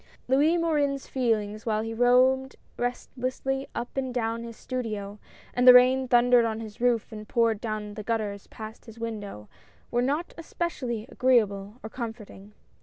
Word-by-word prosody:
OUIS 295 +7 +3
MORIN'S 290 -5 0
feelings 215 -4 -1
while 215 -1 +1
he 225 0 -4
roamed 255 +3 +3 0.2
restlessly 255 +2 -3
XJ - - -39
up 240 - -7
and 265 -1 -2
down 230 -1 -2
his 230 -1 -9
studio, 215 -5 -5 0.3
and 250 +1 +2
the 250 - +11
rain 255 +1 +5
thundered 245 0 +5
on 225 -1 -1
his 220 0 -9
roof 240 -3 +1
and 215 -1 -8
poured 230 -2 +2
down 215 -2 -4
the 215 - -6
gutters 210 -2 -3
past 220 0 -10
his 225 -1 -12
window, 205 - -6 0.4
were 240 - +2
not 290 +7 -1
especially 265 -10 -3
agreeable 210 -5 +2
or 220 - -6
comforting. 220 -4 -8
235 Hz, 160 wpm, -27 LUFS, 215-255 Hz, 0.4 s, the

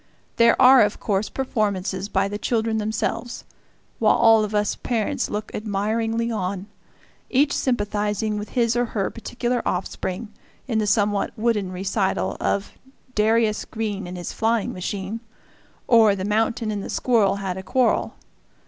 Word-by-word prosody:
There 230 -1 +5
are 255 0 +8
of 205 -1 +1
course 205 0 -1
performances 205 -6 -2
by 195 -1 +1
the 205 +1 -5
children 225 -1 0
themselves, 220 +2 -3 0.6
while - - +4
all 225 -1 +5
of 210 0 -3
us 210 0 +1
parents 225 -4 -1
look 210 +1 -4
admiringly 225 +3 -1
on, 195 -2 -3 0.6
each 280 +2 +3
sympathizing 210 -3 -1
with 210 - -6
his 230 -1 +3
or 245 0 +2
her 195 - 0
particular 240 +1 -2
offspring 190 +3 -3 0.3
in 225 -4 0
the 210 - 0
somewhat 205 0 +1
wooden 215 -4 0
recital 185 - -1
of 200 0 -1 0.4
"Darius 220 0 +2
Green 205 -4 -4
and 180 +1 -7
his 175 - -5
Flying 225 -1 0
Machine" 195 +3 -4 0.7
or 225 -4 +6
"The 190 -1 -4
Mountain 220 +1 0
and 205 -2 -3
the - - -7
Squirrel 225 -6 +2
had 195 -2 -3
a 190 - -5
Quarrel." 250 +6 +1
210 Hz, 150 wpm, -23 LUFS, 200-230 Hz, 0.7 s, are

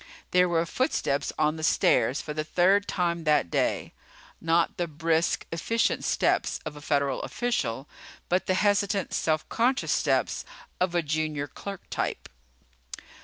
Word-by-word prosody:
There 180 0 +4
were 165 -1 +1
footsteps 155 - -1
on 155 +1 +1
the 160 - -6
stairs 130 -3 +3
for 150 - -6
the 155 0 -2
third 185 +6 +3
time 170 -2 -1
that 150 - +2
day. - - 0 0.5
Not 165 +1 +1
the 175 - -1
brisk, 165 +1 0
efficient 225 +8 0
steps - - +1
of 150 - -5
a 145 - -10
federal 140 -2 0
official, 140 - -2 0.4
but 180 +1 0
the 185 - +2
hesitant, 200 -1 +1
self 155 -1 0
conscious 250 +3 +1
steps - - +1 0.4
of 180 -1 0
a 170 - +2
junior 155 -1 -1
clerk 195 +5 -8
type. - - -3
165 Hz, 145 wpm, -27 LUFS, 150-185 Hz, 0.5 s, There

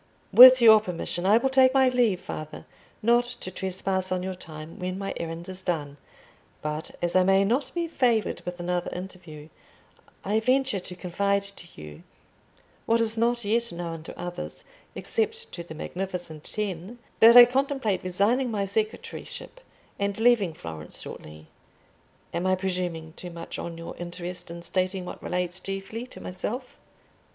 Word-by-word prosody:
"With 255 0 +11
your 220 -1 +9
permission, 180 -1 -4
I 210 +3 +6
will 265 +3 +1
take 265 0 +5
my 265 -1 +5
leave, 240 -7 +2
father, 155 -3 -7 0.4
not 240 +2 +4
to 185 -6 -7
trespass 190 0 -2
on 180 0 -1
your 190 0 -3
time 160 0 -10
when 185 0 -3
my 195 0 -4
errand 165 +1 -5
is 185 0 -6
done; 150 -6 -3 0.7
but 150 +1 -3
as 175 +1 0
I 185 - +6
may 195 +1 +4
not 245 +8 +1
be 340 -1 -1
favoured 240 -8 +1
with 180 0 -6
another 175 0 -2
interview, 175 -5 -9 0.8
I 210 +3 +2
venture 255 -1 +1
to 180 0 -8
confide 200 +3 0
to 200 -3 -10
you—what 75 - -6
is 225 -1 +2
not 235 0 +1
yet 230 +3 0
known 170 -1 -5
to - - -10
others, 175 0 -6 0.3
except 450 +1 -1
to 175 - -6
the 160 -2 -10
magnificent 175 -2 -5
Ten—that 215 +4 +2
I 245 - +13
contemplate 260 -6 0
resigning 205 +8 +1
my 205 -3 -1
secretaryship, 220 - -4 0.4
and 200 +1 -1
leaving 225 -8 +3
Florence 80 - -6
shortly. 75 0 -9 0.9
Am 175 +2 -1
I 185 - +3
presuming 180 -4 -3
too 180 - -8
much 170 -1 -7
on 170 -1 -6
your 165 - -8
interest 175 0 -5
in 170 0 -8
stating 185 +1 -1
what - - -8
relates 180 0 -2
chiefly 195 +5 -5
to - - -11
myself?" 245 +7 -5
190 Hz, 155 wpm, -26 LUFS, 175-230 Hz, 0.9 s, I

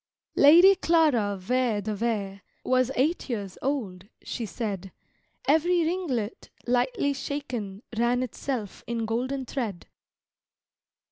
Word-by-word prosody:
Lady 345 +7 +8
Clara 305 - +2
Vere 235 +2 0
de 210 +1 -3
Vere 200 -3 -2 0.2
Was 255 -1 +2
eight 295 +4 0
years 200 -6 -4
old, 205 -10 -3 0.2
she 230 -3 -4
said: 195 -1 -4 0.6
Every 335 +3 +3
ringlet, 305 - -2 0.2
lightly 250 +3 +1
shaken, 245 -8 -5
ran 240 +2 +2
itself 250 -4 -4
in 230 -1 -2
golden 255 +4 -2
thread. 225 -9 -4
245 Hz, 110 wpm, -27 LUFS, 210-280 Hz, 0.6 s, Lady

